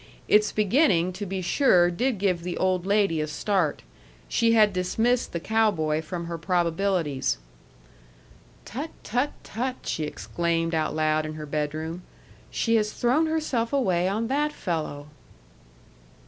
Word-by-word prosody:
Its 210 Hz, 0 st, +4 dB
beginning, 200 Hz, -, +2 dB
to 200 Hz, +2 st, -5 dB
be 190 Hz, 0 st, -3 dB
sure, 175 Hz, -5 st, +4 dB
did 240 Hz, +6 st, 0 dB
give 185 Hz, -3 st, 0 dB
the 175 Hz, 0 st, -4 dB
old 185 Hz, -1 st, 0 dB
lady 200 Hz, -6 st, +2 dB
a 155 Hz, -, -2 dB
start; 170 Hz, 0 st, -1 dB, 0.4 s
she 230 Hz, 0 st, +2 dB
had 215 Hz, -3 st, +5 dB
dismissed 225 Hz, +7 st, 0 dB
the 170 Hz, -, -3 dB
cow 220 Hz, +5 st, +2 dB
boy 155 Hz, -5 st, -1 dB
from 170 Hz, +2 st, -5 dB
her 170 Hz, 0 st, -5 dB
probabilities. 170 Hz, -3 st, 0 dB, 1.3 s
"Tut, 280 Hz, +9 st, -5 dB
tut, 250 Hz, +6 st, 0 dB
tut!" 250 Hz, +4 st, -3 dB
she 155 Hz, -, -2 dB
exclaimed 165 Hz, +2 st, -2 dB
out 155 Hz, -1 st, 0 dB
loud 155 Hz, 0 st, +1 dB
in 155 Hz, 0 st, -5 dB
her 155 Hz, -1 st, -6 dB
bedroom. 155 Hz, +3 st, -3 dB, 0.5 s
"She 230 Hz, -1 st, +1 dB
has 210 Hz, -1 st, 0 dB
thrown 265 Hz, +7 st, +2 dB
herself 300 Hz, -8 st, -1 dB
away 185 Hz, -11 st, +1 dB
on 215 Hz, +4 st, -1 dB
that 295 Hz, +4 st, 0 dB
fellow!" 155 Hz, -, -4 dB
185 Hz, 145 wpm, -26 LUFS, 165-225 Hz, 1.3 s, had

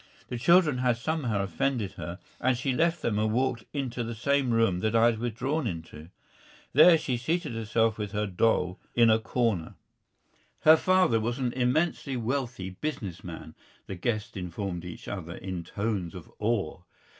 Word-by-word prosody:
The 120 Hz, -, -4 dB
children 160 Hz, -2 st, +4 dB
had 125 Hz, -2 st, +2 dB
somehow 125 Hz, -7 st, -1 dB
offended 120 Hz, 0 st, -1 dB
her, 85 Hz, +1 st, -7 dB, 0.2 s
and 130 Hz, -1 st, +2 dB
she 130 Hz, +1 st, -1 dB
left 165 Hz, +4 st, +1 dB
them 105 Hz, -3 st, 0 dB
and 110 Hz, 0 st, +1 dB
walked 120 Hz, -1 st, 0 dB
into 125 Hz, -4 st, -3 dB
the 115 Hz, 0 st, -5 dB
same 140 Hz, +3 st, +1 dB
room 115 Hz, -6 st, +2 dB
that 110 Hz, +4 st, 0 dB
I 115 Hz, 0 st, +6 dB
had 115 Hz, -2 st, +2 dB
withdrawn 125 Hz, +5 st, -1 dB
into. 80 Hz, -3 st, -7 dB, 0.6 s
There 165 Hz, +4 st, +8 dB
she 130 Hz, -5 st, -2 dB
seated 160 Hz, +3 st, -1 dB
herself 115 Hz, 0 st, 0 dB
with 105 Hz, -2 st, -3 dB
her 105 Hz, 0 st, -1 dB
doll 90 Hz, -2 st, +1 dB, 0.2 s
in 115 Hz, -2 st, +6 dB
a 110 Hz, -, +4 dB
corner. 110 Hz, -7 st, -1 dB, 0.9 s
"Her 155 Hz, +1 st, +8 dB
father 180 Hz, -11 st, +3 dB
is 120 Hz, -, -4 dB
an 125 Hz, -3 st, -1 dB
immensely 130 Hz, +2 st, 0 dB
wealthy 120 Hz, -5 st, -2 dB
business 95 Hz, -, -5 dB
man," 80 Hz, -2 st, -8 dB, 0.3 s
the -, -, -6 dB
guests 105 Hz, +3 st, -2 dB
informed 90 Hz, -1 st, -4 dB
each 90 Hz, -, -9 dB
other 90 Hz, -3 st, -5 dB
in 90 Hz, -2 st, -5 dB
tones 100 Hz, -3 st, -3 dB
of 90 Hz, -, -10 dB
awe. 105 Hz, -8 st, -1 dB
115 Hz, 170 wpm, -28 LUFS, 100-130 Hz, 0.9 s, There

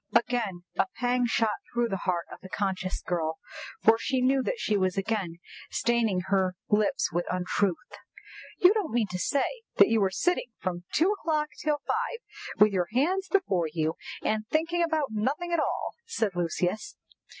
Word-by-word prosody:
Again 230 Hz, -6 st, +1 dB, 0.2 s
a -, -, +4 dB
pang 245 Hz, 0 st, +1 dB
shot 225 Hz, -2 st, +1 dB
through 240 Hz, -1 st, +1 dB
the 195 Hz, -3 st, -3 dB
heart 175 Hz, -2 st, 0 dB
of -, -, -9 dB
the 190 Hz, -, -10 dB
conscious 190 Hz, -1 st, -2 dB
girl 160 Hz, -2 st, -1 dB, 0.5 s
for 225 Hz, +1 st, +6 dB
she 260 Hz, +2 st, 0 dB
knew 265 Hz, +1 st, +3 dB
that -, -, -2 dB
she 215 Hz, -, 0 dB
was 185 Hz, -1 st, +1 dB
again 195 Hz, -4 st, -1 dB, 0.3 s
staining 230 Hz, -6 st, +1 dB
her 190 Hz, -2 st, +2 dB
lips 210 Hz, 0 st, +2 dB
with 175 Hz, +1 st, -1 dB
untruth. 180 Hz, +1 st, +1 dB, 0.8 s
"You 365 Hz, +2 st, +7 dB
don't 420 Hz, -7 st, -1 dB
mean 235 Hz, -2 st, +3 dB
to 180 Hz, -, -3 dB
say 285 Hz, -, 0 dB
that -, -, +7 dB
you 225 Hz, -1 st, +3 dB
were 195 Hz, -, +3 dB
sitting 245 Hz, -, 0 dB
from 175 Hz, -1 st, -3 dB
two 350 Hz, +5 st, +3 dB
o'clock 310 Hz, -7 st, 0 dB
till 300 Hz, -2 st, +1 dB
five, -, -, -1 dB, 0.4 s
with 210 Hz, 0 st, +6 dB
your 180 Hz, -2 st, +1 dB
hands 365 Hz, +10 st, +1 dB
before 195 Hz, -, +2 dB
you, 160 Hz, -1 st, 0 dB, 0.3 s
and 215 Hz, 0 st, 0 dB
thinking 330 Hz, +3 st, +1 dB
about 315 Hz, -5 st, +1 dB
nothing 275 Hz, +11 st, -1 dB
at 340 Hz, -, +3 dB
all," -, -, -1 dB, 0.2 s
said 220 Hz, -, 0 dB
Lucius. 175 Hz, -, -1 dB
220 Hz, 170 wpm, -28 LUFS, 185-290 Hz, 0.8 s, You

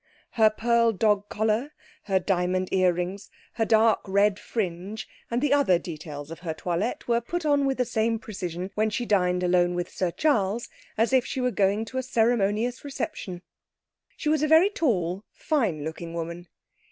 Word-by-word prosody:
Her 220 Hz, -2 st, +5 dB
pearl 230 Hz, +1 st, +2 dB
dog 210 Hz, 0 st, +1 dB
collar, 220 Hz, +7 st, 0 dB, 0.3 s
her 195 Hz, -2 st, +2 dB
diamond 185 Hz, 0 st, 0 dB
ear 185 Hz, -1 st, +4 dB
rings, 180 Hz, +3 st, -4 dB, 0.2 s
her 225 Hz, -, 0 dB
dark 220 Hz, 0 st, +4 dB
red 200 Hz, +1 st, +2 dB
fringe 200 Hz, 0 st, -4 dB, 0.2 s
and 240 Hz, +3 st, -1 dB
the 290 Hz, -1 st, +3 dB
other 280 Hz, -11 st, +4 dB
details 155 Hz, -3 st, -8 dB
of 165 Hz, -, -8 dB
her 165 Hz, -3 st, -4 dB
toilette 180 Hz, +8 st, -2 dB
were 235 Hz, 0 st, +2 dB
put 345 Hz, +8 st, -4 dB
on 285 Hz, -2 st, +3 dB
with 270 Hz, -, 0 dB
the 250 Hz, -, +1 dB
same 225 Hz, 0 st, 0 dB
precision 185 Hz, -4 st, -5 dB
when 215 Hz, +1 st, +1 dB
she 240 Hz, +3 st, -2 dB
dined 180 Hz, -4 st, +2 dB
alone 175 Hz, 0 st, +2 dB
with 175 Hz, 0 st, -3 dB
Sir 185 Hz, -, -1 dB
Charles 210 Hz, -, 0 dB, 0.3 s
as 230 Hz, +4 st, +2 dB
if 260 Hz, -2 st, +5 dB
she 265 Hz, -, -4 dB
were 250 Hz, 0 st, +1 dB
going 205 Hz, +1 st, +1 dB
to 260 Hz, +4 st, -4 dB
a -, -, 0 dB
ceremonious 230 Hz, 0 st, +1 dB
reception. 235 Hz, -, -5 dB, 0.7 s
She -, -, -4 dB
was 305 Hz, -1 st, +2 dB
a 305 Hz, -, +2 dB
very 325 Hz, +6 st, +6 dB
tall, 195 Hz, -, 0 dB
fine 220 Hz, -, -1 dB
looking 165 Hz, +2 st, -6 dB
woman. 170 Hz, +1 st, -5 dB
210 Hz, 175 wpm, -26 LUFS, 180-240 Hz, 0.7 s, very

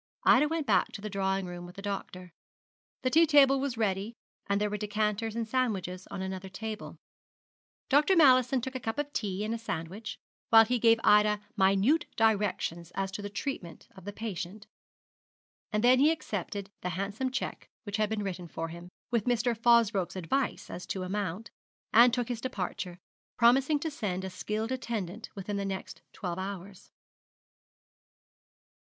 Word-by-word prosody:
Ida 295 Hz, +4 st, +6 dB
went 320 Hz, -1 st, -2 dB
back -, -, +2 dB
to 200 Hz, -, -7 dB
the 215 Hz, 0 st, -5 dB
drawing 195 Hz, -1 st, 0 dB
room 175 Hz, 0 st, -7 dB
with 180 Hz, -, -13 dB
the 195 Hz, -, -8 dB
doctor. 185 Hz, -3 st, -5 dB, 0.7 s
The 255 Hz, -, +1 dB
tea 330 Hz, +3 st, +6 dB
table 275 Hz, -2 st, +6 dB
was 265 Hz, -3 st, -2 dB
ready, 205 Hz, +1 st, -1 dB, 0.3 s
and 200 Hz, 0 st, +1 dB
there 210 Hz, 0 st, 0 dB
were -, -, -1 dB
decanters 210 Hz, +1 st, -1 dB
and 230 Hz, -1 st, -2 dB
sandwiches 200 Hz, -7 st, -1 dB
on 190 Hz, -, -5 dB
another 190 Hz, 0 st, -5 dB
table. 215 Hz, +3 st, -6 dB, 0.9 s
Dr. 295 Hz, +7 st, +4 dB
Mallison 255 Hz, -5 st, +5 dB
took 265 Hz, +2 st, -5 dB
a 260 Hz, -, -3 dB
cup 225 Hz, +1 st, -4 dB
of 290 Hz, 0 st, -3 dB
tea 200 Hz, -2 st, -2 dB
and 220 Hz, -, -2 dB
a 230 Hz, -, -3 dB
sandwich, 195 Hz, 0 st, -5 dB, 0.3 s
while 225 Hz, 0 st, +8 dB
he 245 Hz, +2 st, 0 dB
gave 230 Hz, 0 st, +5 dB
Ida 210 Hz, 0 st, +5 dB, 0.2 s
minute 200 Hz, -, +3 dB
directions 200 Hz, -6 st, +1 dB
as 195 Hz, 0 st, -2 dB
to 195 Hz, -, -5 dB
the 205 Hz, -, -5 dB
treatment 205 Hz, -, -5 dB
of 190 Hz, -, -13 dB
the 205 Hz, -, -4 dB
patient. 205 Hz, -1 st, -6 dB, 1.1 s
And 210 Hz, +1 st, 0 dB
then 250 Hz, +1 st, +6 dB
he 290 Hz, +3 st, +6 dB
accepted 200 Hz, -, -3 dB
the 180 Hz, -, -2 dB
handsome 200 Hz, +7 st, -2 dB
cheque 265 Hz, +1 st, -4 dB
which 205 Hz, -1 st, -3 dB
had 215 Hz, -1 st, +1 dB
been 215 Hz, -1 st, -2 dB
written 180 Hz, -3 st, -4 dB
for 165 Hz, 0 st, -5 dB
him, 170 Hz, +2 st, -9 dB, 0.2 s
with 235 Hz, -4 st, +1 dB
Mr. 240 Hz, -1 st, +1 dB
Fosbroke's 225 Hz, -5 st, +3 dB
advice 220 Hz, +10 st, -2 dB
as 180 Hz, -, -7 dB
to 190 Hz, -, -3 dB
amount, 195 Hz, +2 st, -3 dB, 0.4 s
and 240 Hz, +2 st, +8 dB
took 245 Hz, -1 st, -1 dB
his 240 Hz, -2 st, -4 dB
departure, 180 Hz, -6 st, -4 dB, 0.4 s
promising 265 Hz, +5 st, +4 dB
to 320 Hz, -, -2 dB
send 190 Hz, -9 st, -3 dB
a 190 Hz, -, -5 dB
skilled 215 Hz, +5 st, -3 dB
attendant 225 Hz, -5 st, -4 dB
within 200 Hz, +1 st, -4 dB
the 200 Hz, -, -2 dB
next 195 Hz, -1 st, -5 dB
twelve 180 Hz, -2 st, -4 dB
hours. 195 Hz, 0 st, -7 dB
210 Hz, 170 wpm, -30 LUFS, 190-240 Hz, 1.1 s, while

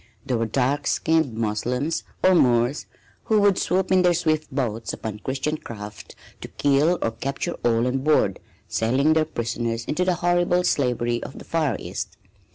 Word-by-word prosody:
There 125 Hz, -4 st, 0 dB
were 115 Hz, -, 0 dB
dark 135 Hz, +5 st, 0 dB
skinned 160 Hz, -7 st, +1 dB
Moslems 125 Hz, +8 st, -1 dB, 0.2 s
or 185 Hz, -, +6 dB
Moors 125 Hz, -3 st, +2 dB, 0.4 s
who 215 Hz, -1 st, +3 dB
would 200 Hz, -2 st, +4 dB
swoop 190 Hz, +1 st, 0 dB
in 185 Hz, -1 st, +5 dB
their 175 Hz, -1 st, +4 dB
swift 155 Hz, -2 st, 0 dB
boats 115 Hz, -5 st, -2 dB
upon 105 Hz, -2 st, -6 dB
Christian 135 Hz, +6 st, -2 dB
craft 105 Hz, -5 st, -9 dB, 0.3 s
to -, -, -6 dB
kill 145 Hz, +5 st, +2 dB
or 115 Hz, -, 0 dB
capture 135 Hz, +8 st, -3 dB
all 115 Hz, 0 st, +2 dB
on 125 Hz, +1 st, 0 dB
board, 135 Hz, -9 st, +2 dB, 0.3 s
selling 130 Hz, +7 st, +2 dB
their 160 Hz, 0 st, +2 dB
prisoners 115 Hz, -3 st, -3 dB
into 180 Hz, +4 st, 0 dB
the 180 Hz, -1 st, +1 dB
horrible 175 Hz, +1 st, +2 dB
slavery 120 Hz, -6 st, 0 dB
of 130 Hz, -, -8 dB
the -, -, -10 dB
Far 155 Hz, -8 st, 0 dB
East. -, -, -6 dB
135 Hz, 165 wpm, -24 LUFS, 115-160 Hz, 0.4 s, or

